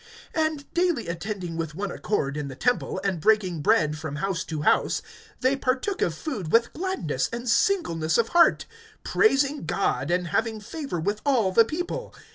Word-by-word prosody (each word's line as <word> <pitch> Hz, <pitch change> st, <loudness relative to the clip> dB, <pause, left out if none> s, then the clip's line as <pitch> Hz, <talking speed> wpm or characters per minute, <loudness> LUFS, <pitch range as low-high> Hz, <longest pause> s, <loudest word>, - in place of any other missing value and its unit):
(46)And 315 Hz, -3 st, 0 dB
daily 340 Hz, -, +1 dB
attending 175 Hz, 0 st, -4 dB
with 160 Hz, -2 st, -4 dB
one 195 Hz, +1 st, -3 dB
accord 140 Hz, -11 st, -1 dB
in 150 Hz, -1 st, -3 dB
the 130 Hz, -, -7 dB
temple, 245 Hz, -, 0 dB
and 190 Hz, -4 st, 0 dB
breaking 185 Hz, -5 st, +2 dB
bread 155 Hz, -5 st, +2 dB
from 155 Hz, -2 st, -5 dB
house 190 Hz, +3 st, -2 dB
to 155 Hz, -2 st, -4 dB
house, -, -, +2 dB, 0.4 s
they 260 Hz, +2 st, +3 dB
partook 270 Hz, +9 st, -1 dB
of 165 Hz, -, +1 dB
food 200 Hz, -, -5 dB
with 235 Hz, +1 st, +3 dB
gladness 245 Hz, -, -2 dB
and 235 Hz, +1 st, -5 dB
singleness 220 Hz, -, +2 dB
of 230 Hz, -1 st, +2 dB
heart, 345 Hz, 0 st, +4 dB, 0.4 s
(47)praising 290 Hz, -8 st, +2 dB
God, 160 Hz, -6 st, 0 dB
and 175 Hz, 0 st, 0 dB
having 225 Hz, +2 st, 0 dB
favor 275 Hz, -, -5 dB
with 205 Hz, +6 st, -2 dB
all 245 Hz, -9 st, +2 dB
the 225 Hz, +4 st, +6 dB
people. 355 Hz, -, -4 dB
215 Hz, 170 wpm, -25 LUFS, 165-275 Hz, 0.4 s, the